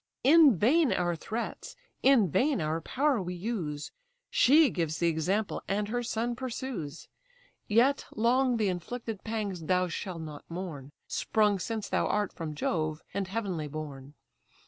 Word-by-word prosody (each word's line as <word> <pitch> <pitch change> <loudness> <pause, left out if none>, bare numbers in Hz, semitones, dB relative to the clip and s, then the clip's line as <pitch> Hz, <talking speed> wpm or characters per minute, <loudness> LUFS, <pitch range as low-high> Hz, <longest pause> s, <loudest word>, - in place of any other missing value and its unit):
In 290 - +7
vain 280 - +4
our 175 -1 +1
threats, 220 +8 -5 0.3
in 260 -7 +5
vain 280 - +2
our 160 +1 -1
power 270 - +1
we 180 0 -4
use; 175 -7 -4 0.4
She 290 +1 +6
gives 165 -3 -1
the 170 - +2
example, 185 +7 -1
and 205 +1 -1
her 245 +2 -1
son 235 0 -2
pursues. 235 - -5 0.6
Yet 245 +6 +3
long 245 +3 +3
the 215 -2 +1
inflicted 210 +4 -4
pangs 205 -7 -3
thou 180 +1 +2
shall 180 +1 -4
not 155 -3 -8
mourn, 165 -6 -6 0.2
Sprung 210 -2 +1
since 220 +2 -3
thou - - +1
art 210 -1 0
from 155 -2 -5
Jove, 155 0 -1
and 195 -1 -2
heavenly 190 -7 -3
born. 145 -2 -7
200 Hz, 145 wpm, -29 LUFS, 165-235 Hz, 0.6 s, In